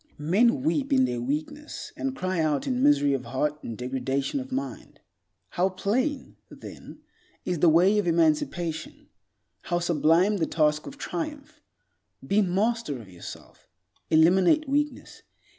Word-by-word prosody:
Men 225 - +2
weep 290 -2 0
in 260 -1 +4
their 120 - -3
weakness, 155 - -5
and 270 -1 -3
cry 185 -5 -2
out 150 -3 0
in 255 -2 -1
misery 275 - +4
of 130 -2 -3
heart 145 +5 -2
and 115 - -7
degradation 135 - -2
of 265 0 -8
mind. 275 +2 -5 0.5
How 185 +1 +1
plain, 250 +10 -2
then, - - -11 0.4
is 180 -3 -1
the 170 - +5
way 185 +6 +4
of 200 - -1
emancipation; 160 0 0 0.5
how 175 - -1
sublime 175 +4 +2
the 160 - 0
task 150 -1 +1
of 280 - -9
triumph! 300 -2 -6 0.6
Be 200 +2 +2
master 205 - 0
of 110 -5 -12
yourself. 90 -2 -12 0.4
Eliminate 180 - +4
weakness. 295 +2 -2
180 Hz, 140 wpm, -26 LUFS, -, 0.6 s, the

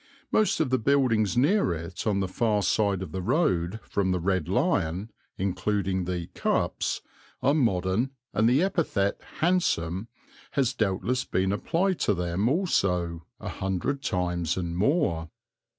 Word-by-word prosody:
Most 215 - +2
of 150 -5 +1
the 130 - +3
buildings 115 -6 +2
near 145 - +3
it 85 +6 -6
on 100 -2 +2
the 95 - 0
far 105 +1 +1
side 100 -1 +1
of 85 - -8
the 95 - -3
road 95 - +1
from 100 -2 0
the 90 - +1
"Red 95 -2 0
Lion," 90 +7 0 0.3
including 95 0 -1
the 90 -1 -2
"Cups," - - 0 0.4
are 140 - +4
modern 110 - +1 0.2
and 110 +2 +3
the 135 +7 +4
epithet 160 - 0 0.2
"handsome" 110 - +1 0.5
has 135 -3 +1
doubtless 115 +3 0
been 95 +1 0
applied 175 - 0
to 105 - +2
them 90 +5 0
also 90 - 0
a - - -5
hundred 95 +9 -2
times 90 - -1
and 85 -2 -3
more. 95 - +1
100 Hz, 145 wpm, -27 LUFS, 90-130 Hz, 0.5 s, are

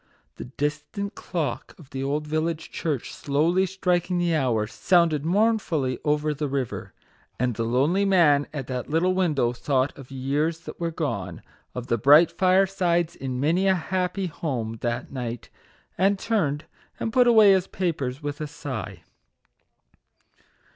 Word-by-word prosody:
The - - -7
distant 150 - -4
clock 145 -9 -4
of 150 -6 -16
the 135 - -4
old 145 +2 -1
village 155 +1 -2
church, 150 -7 -3
slowly 165 +7 +1
striking 180 -1 0
the 175 -1 +1
hour, 125 -8 +1
sounded 165 - +2
mournfully 170 - +1
over 150 0 +1
the 150 +1 -3
river; 135 -3 -3 0.5
and 125 0 +1
the 115 - -4
lonely 140 +12 +2
man 165 -8 +4
at 145 -4 -5
that 125 -1 -5
little 170 +4 +2
window 150 -10 +1
thought 130 +2 0
of 135 -2 -12
years 145 +5 -1
that - - -10
were 170 -1 -1
gone, 100 - -4 0.3
of 125 -1 -4
the 115 -2 0
bright 150 +7 +7
firesides 185 -2 +2
in 130 -2 -4
many 170 +7 +2
a 190 - +4
happy 185 +2 -2
home 125 -9 -4
that 120 +1 -3
night, 120 -3 -5 0.5
and 195 +2 +3
turned 160 -9 -1 0.3
and 225 - -3
put 250 -1 +5
away 220 -4 +7
his 190 -1 +2
papers 145 -7 -3
with 145 0 -4
a 155 - -2
sigh. 145 -6 -6
155 Hz, 150 wpm, -25 LUFS, 135-180 Hz, 0.5 s, bright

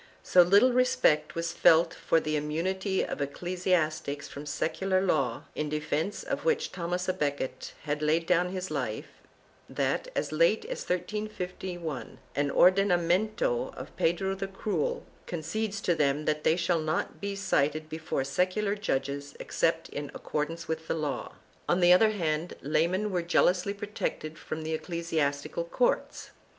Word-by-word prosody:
3 - - -13
So 180 - +9
little 200 +8 +5
respect 250 -12 +3
was 165 0 -1
felt 165 +1 +5
for 165 - +2
the 155 -1 -2
immunity 185 +6 -1
of - - -5
ecclesiastics 155 -2 -1
from 145 +1 -8
secular 185 +5 0
law, 140 -11 0
in 150 -1 -2
defence 155 +6 -2
of - - -3
which 475 -1 +1
Thomas 180 +1 -3
a" 185 - +2
Becket 140 -4 -3
had 150 0 -2
laid 160 +2 +2
down 180 +1 +2
his 185 0 -4
life, - - -3 0.6
that, - - -1
as - - -1
late - - +3
as - - -4
1351, 180 -5 -4 0.2
an 145 0 +1
ordena 185 +4 +5
miento 215 - 0
of - - -9
Pedro 190 +3 +1
the 195 0 -4
Cruel 195 -4 -2 0.2
concedes 200 +5 -3
to 175 - +2
them 150 -1 +1
that 150 0 0
they 160 - +4
shall 175 -2 +1
not 155 0 -2
be 200 0 -3
cited 155 -5 0
before 155 -3 -2
secular 185 +8 0
judges 140 -7 -2
except 165 0 0
in 145 -1 -5
accordance 160 +3 -3
with 160 0 -4
law.4 150 -3 -2 0.4
On 175 - +3
the 175 0 +7
other 215 +4 +6
hand, 165 -5 -1
laymen 175 +8 +1
were 180 -2 0
jealously 180 +3 +2
protected 200 -6 -4
from 155 0 -5
the 160 +1 -2
ecclesiastical 160 -1 -2
courts. 245 +8 0
170 Hz, 150 wpm, -29 LUFS, 155-190 Hz, 0.6 s, So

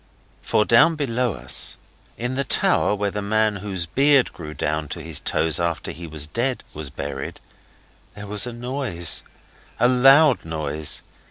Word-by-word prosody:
For, 105 - +1
down 165 +8 +5
below 125 -5 -1
us, 60 -5 -2 0.4
in 120 +2 -3
the 135 +1 -1
tower 105 - +2
where 100 0 -2
the 105 - -4
man 110 0 +1
whose 95 -3 -3
beard 140 - +3
grew 75 -2 -9
down 75 0 -2
to 85 - -6
his 80 -2 0
toes 80 -1 +1
after 85 -1 -2
he 85 0 -9
was 75 -2 -2
dead 120 - -2
was 75 -2 -4
buried, 70 0 -6 0.8
there 105 - -8
was 105 +3 +1
a - - -4
noise 120 - 0 0.6
a 120 - +4
loud 135 +2 +5
noise. 80 -2 -3
105 Hz, 160 wpm, -22 LUFS, 80-125 Hz, 0.8 s, down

